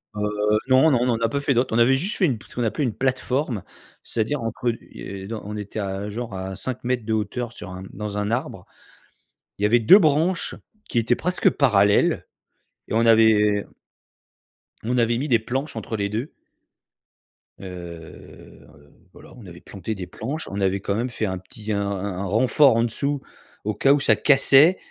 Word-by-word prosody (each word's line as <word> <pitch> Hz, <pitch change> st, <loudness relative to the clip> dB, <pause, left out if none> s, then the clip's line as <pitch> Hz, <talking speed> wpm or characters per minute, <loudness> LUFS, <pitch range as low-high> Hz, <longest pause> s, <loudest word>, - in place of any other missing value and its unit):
Heu, 105 Hz, -, -4 dB, 0.5 s
non, 130 Hz, +4 st, +5 dB
non, 125 Hz, -5 st, +3 dB
on 125 Hz, -, +1 dB
en 115 Hz, -, +1 dB
n'a 115 Hz, 0 st, 0 dB
pas 140 Hz, -, -1 dB
fait 140 Hz, -1 st, +1 dB
d'autres. 120 Hz, -1 st, 0 dB
On -, -, +2 dB
avait 130 Hz, +3 st, +5 dB
juste 190 Hz, -, -3 dB
fait 190 Hz, -, +3 dB
une 130 Hz, -9 st, 0 dB
pl -, -, -17 dB
ce -, -, -16 dB
qu'on 120 Hz, -, -1 dB
appelait 115 Hz, +6 st, -1 dB
une 120 Hz, -6 st, -1 dB
plateforme, 130 Hz, -, -1 dB, 0.4 s
c'est-à-dire 115 Hz, +4 st, -2 dB
entre 115 Hz, +2 st, -1 dB, 0.2 s
et 95 Hz, 0 st, -8 dB
dans 110 Hz, 0 st, -5 dB
on 105 Hz, -, -6 dB
était 105 Hz, +1 st, -6 dB
à 100 Hz, +1 st, -4 dB
genre 115 Hz, 0 st, -6 dB
à 95 Hz, 0 st, -5 dB
5 130 Hz, +5 st, -5 dB
mètres 120 Hz, -2 st, -1 dB
de 110 Hz, -, -1 dB
hauteur 110 Hz, +3 st, -2 dB
sur 100 Hz, -, -9 dB
un 90 Hz, 0 st, -8 dB
dans 105 Hz, 0 st, -5 dB
un 105 Hz, +1 st, -1 dB
arbre. 120 Hz, -, -3 dB, 0.9 s
Il 100 Hz, -, -4 dB
y -, -, +5 dB
avait 120 Hz, +3 st, +4 dB
2 115 Hz, -, +8 dB
branches 160 Hz, +2 st, +1 dB, 0.3 s
qui 120 Hz, -, 0 dB
étaient 115 Hz, +2 st, +1 dB
presque 180 Hz, +6 st, +1 dB
parallèles 100 Hz, -7 st, +3 dB, 0.6 s
et -, -, -5 dB
on 115 Hz, +1 st, +3 dB
avait 105 Hz, -2 st, +4 dB, 1.2 s
on 125 Hz, +3 st, -1 dB
avait 120 Hz, 0 st, +2 dB
mis 140 Hz, -, -2 dB
des 120 Hz, -5 st, +3 dB
planches 130 Hz, +5 st, -4 dB
entre 110 Hz, 0 st, -4 dB
les 100 Hz, 0 st, -1 dB
2 115 Hz, +8 st, -4 dB, 1.3 s
heu, 85 Hz, -3 st, -11 dB, 0.5 s
voilà, -, -, -15 dB
on 115 Hz, -5 st, -13 dB
avait 85 Hz, -1 st, -11 dB
planté 105 Hz, +2 st, -6 dB
des 90 Hz, -2 st, -7 dB
planches, 145 Hz, +8 st, -5 dB
on 100 Hz, +1 st, -4 dB
avait 95 Hz, 0 st, +1 dB
quand 100 Hz, +1 st, -2 dB
même 120 Hz, +3 st, -1 dB
fait 110 Hz, -2 st, -3 dB
un 95 Hz, -1 st, -2 dB
petit, 105 Hz, +4 st, -8 dB
un 100 Hz, -, 0 dB
un 100 Hz, -1 st, -3 dB
un 95 Hz, -3 st, -4 dB
un 100 Hz, -, -3 dB
renfort 125 Hz, +5 st, +4 dB
en 115 Hz, -, +2 dB
dessous, 140 Hz, +5 st, -1 dB, 0.4 s
au 105 Hz, -, 0 dB
cas 135 Hz, +6 st, +4 dB
où 145 Hz, -, +2 dB
ça 135 Hz, -, +3 dB
cassait. 145 Hz, +4 st, +5 dB
115 Hz, 200 wpm, -23 LUFS, 100-130 Hz, 1.3 s, 2